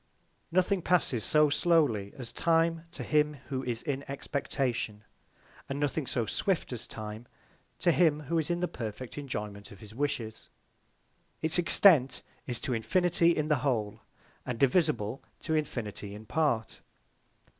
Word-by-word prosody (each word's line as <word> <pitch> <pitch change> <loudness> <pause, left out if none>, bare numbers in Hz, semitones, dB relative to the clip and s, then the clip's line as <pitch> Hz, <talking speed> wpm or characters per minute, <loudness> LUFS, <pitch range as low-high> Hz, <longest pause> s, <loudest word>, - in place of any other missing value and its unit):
Nothing 185 +2 +2
passes 160 - +1
so 150 +3 +4
slowly 145 - +2
as 125 -4 -6
Time 165 0 +2
to 170 - -6
him 150 0 +2
who 130 -1 -2
is 120 -2 -3
in 140 -1 -2
Expectation; 130 -6 -2 0.7
and 135 +1 -3
nothing 145 -1 -1
so 120 - 0
swift 170 - -1
as 120 - -5
Time 110 +2 -7 0.5
to 175 - +3
him 155 -3 +3
who 165 +3 0
is 160 - -2
in 175 0 0
the 180 - +1
perfect 115 -1 -6
Enjoyment 105 -7 -6
of 100 - -12
his 110 -1 -12
Wishes. 115 -4 -3 0.9
It's 160 +2 +5
Extent 160 -7 +5 0.2
is 120 -2 -1
to 130 - -2
Infinity, 170 - +2
in 155 - +1
the 150 -1 +2
Whole; 115 -5 -1 0.4
and 125 -2 -4
divisible 135 - +2 0.2
to 160 - -2
Infinity 110 -9 -3
in 110 +1 -10
part. 120 -5 0
140 Hz, 145 wpm, -30 LUFS, 115-160 Hz, 0.9 s, It's